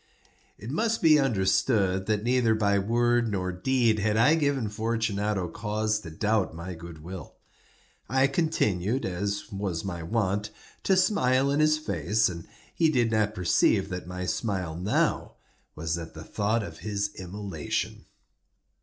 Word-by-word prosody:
It 110 +5 -7
must 225 +7 0
be 155 -2 +7
understood, 95 -4 +1
that 105 -1 0
neither 120 -2 +3
by 100 -2 +2
word 120 +3 +2
nor 95 -2 -1
deed 115 +4 +1
had 105 +1 +1
I 120 +7 +5
given 145 -7 +1
Fortunato 105 -3 -1
cause 105 +3 -1
to 95 - -9
doubt 105 +2 0
my 85 +2 -6
good 85 -2 -10
will. 90 +2 -8 0.7
I 130 +1 +3
continued, 135 - 0
as 100 +3 -3
was 95 -3 -3
my 90 -3 -4
wont, 105 +3 -1 0.4
to 190 - +4
smile 135 -9 +3
in 145 - +1
his 155 0 +4
face, 105 - 0
and 85 -2 -8 0.3
he 165 -2 +3
did 120 -6 +2
not 110 -1 +1
perceive 95 +2 +2
that 90 -2 -5
my 90 0 -4
smile 90 -5 -2
now 90 +5 0 0.4
was 80 +1 -2
at 80 -1 -9
the 80 - -8
thought 110 +5 0
of - - -9
his 100 -1 -2
immolation. 95 -3 -4
105 Hz, 150 wpm, -27 LUFS, 95-120 Hz, 0.7 s, be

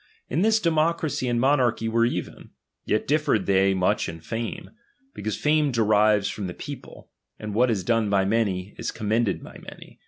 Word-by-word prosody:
In 155 +7 +1
this 220 +2 +3
democracy 160 -5 0
and 120 -1 0
mo 135 +4 +4
narchy 120 -3 0
were 115 +1 +2
even; - - -5 0.4
yet 110 - 0
differed 145 -9 +1
they 95 0 +3
much 90 -2 +1
in 80 0 -8
fame. 115 +5 -5 0.4
Because 110 -1 -4
fame 150 -1 +2
derives 105 -3 +3
from 100 -1 -4
the 90 - -7
people; - - -10 0.3
and 105 -1 -6
what 125 +4 +3
is 105 -5 0
done 115 -1 +1
by 100 -1 +2
many, 100 -3 -1
is - - -3
commended 110 -1 -1
by - - -11
many. - - -13
115 Hz, 180 wpm, -25 LUFS, 100-130 Hz, 0.4 s, mo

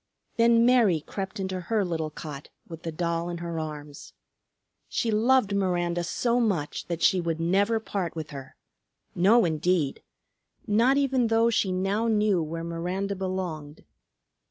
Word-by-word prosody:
Then 230 0 +5
Mary 235 -9 +4
crept 190 +5 -6
into 190 -1 -3
her 205 +3 0
little 160 -3 -2
cot 150 -2 -8 0.2
with 165 -1 -9
the 165 - -4
doll 170 +1 -2
in 175 - -4
her 170 -1 -4
arms. 150 -2 -8 0.8
She 230 - -1
loved 220 -1 +3
Miranda 175 -3 0
so 235 +7 0
much 190 -11 -1
that 170 -1 -3
she 185 - +4
would 165 -1 -2
never 200 +7 +2
part 195 -6 -4
with 160 -2 -6
her, 135 -2 -9 0.6
no 205 +5 +4
indeed; 160 -2 0 0.6
not 235 +6 +3
even 265 -4 +2
though 225 +1 +3
she 200 -4 +1
now 195 +5 0
knew 210 -4 +2
where 165 +1 -4
Miranda 180 +4 -3
belonged. 180 -6 -5
185 Hz, 150 wpm, -26 LUFS, 165-215 Hz, 0.8 s, Then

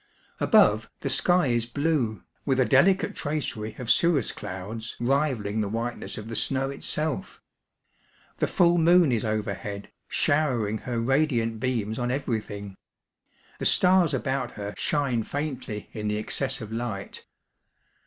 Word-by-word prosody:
Above, - - +4
the - - -1
sky 175 -2 +3
is 120 -2 +1
blue, 140 -5 -1 0.2
with 135 -2 +1
a 130 - +4
delicate 180 +10 +3
tracery 130 -8 -3
of 125 -2 0
cirrus 165 -9 +3
douds 105 +3 -6
rivalling 120 -5 0
the 100 - -2
whiteness 115 +3 -4
of 110 0 -7
the 115 - -5
snow 135 +4 0
itself. 155 +6 -2 1.0
Tl^e - - +1
full 175 -2 +4
moon 170 -2 +5
is 115 -3 +1
overhead, 105 -2 -3 0.2
showering 125 -8 +1
her 120 0 -3
radiant 120 -3 +1
beams 115 -3 -1
on 120 0 -1
everything; 110 -6 -3 0.8
the - - -3
stars 180 -3 +4
about 130 -2 -2
her 100 0 -6
shine 135 -6 0
faintly 130 -5 -4
in 105 -2 -4
the 105 0 0
excess 130 +4 -2
of 110 -1 -7
light. 110 -4 -5
120 Hz, 135 wpm, -26 LUFS, 110-145 Hz, 1.0 s, moon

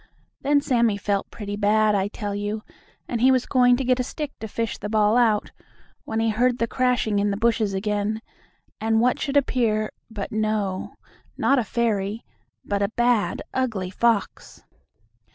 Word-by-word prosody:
Then 285 +1 +3
Sammie 235 -6 +2
felt 200 -1 -1
pretty 205 -2 -6
bad, 210 +1 +3
I 195 -1 +1
tell 205 -1 -5
you, 205 +1 -3 0.4
and 235 -2 -2
he 260 +2 +6
was 255 -1 +2
going 245 -2 +4
to 270 - -2
get 255 0 +2
a - - +1
stick 295 +3 -5
to 220 - -5
fish 230 +1 -3
the 210 - -5
ball 215 0 +3
out, 225 -4 +2 0.5
when 220 - -2
he 225 0 +2
heard 245 +3 +2
the 230 - +1
crashing 245 -4 +1
in 205 +1 +1
the 200 - -1
bushes 220 -3 +1
again, 210 +2 -1 0.6
and 220 0 +2
what 245 +2 +2
should 285 0 0
appear 225 -6 +1 0.2
but 210 -3 -6
no, 215 -3 -2 0.4
not 275 -1 +3
a - - +1
fairy, 220 -2 -1 0.4
but 200 +1 -1
bad, 240 -3 +1
ugly 220 -8 -1
fox. 225 -1 -1
220 Hz, 170 wpm, -24 LUFS, 205-245 Hz, 0.6 s, he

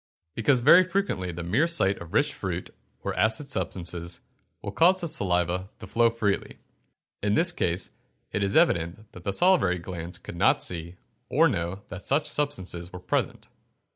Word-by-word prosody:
_ - - - 0.3
Because 120 +3 +2
very 170 +8 +8
frequently 180 - -1
the 85 +1 -6
mere 110 - +2
sight 100 -13 +2
of 85 -1 -9
rich - - +2
fruit, - - -4 0.3
or - - -2
acid 110 +6 +1
substances, 85 -8 -4 0.4
will 100 - -4
cause 180 - +4
the 170 - -2
saliva 90 - 0
to - - -9
flow 115 +4 +3
freely. 110 -4 -2 0.6
In 105 0 +1
this 175 +8 +3
case 90 - -2 0.4
it 105 - -1
is 100 0 +1
evident 85 +6 +1
that 90 - -13
the 100 - 0
salivary 165 - +3
glands 85 0 -7
could - - -9
not 85 - +3
see 85 0 -4 0.3
or - - +5
know 85 +4 -3
that 95 +1 -8
such 145 +3 +1
substances 95 -12 -3
were 90 - -7
present. - - -2
95 Hz, 170 wpm, -26 LUFS, 90-135 Hz, 0.6 s, very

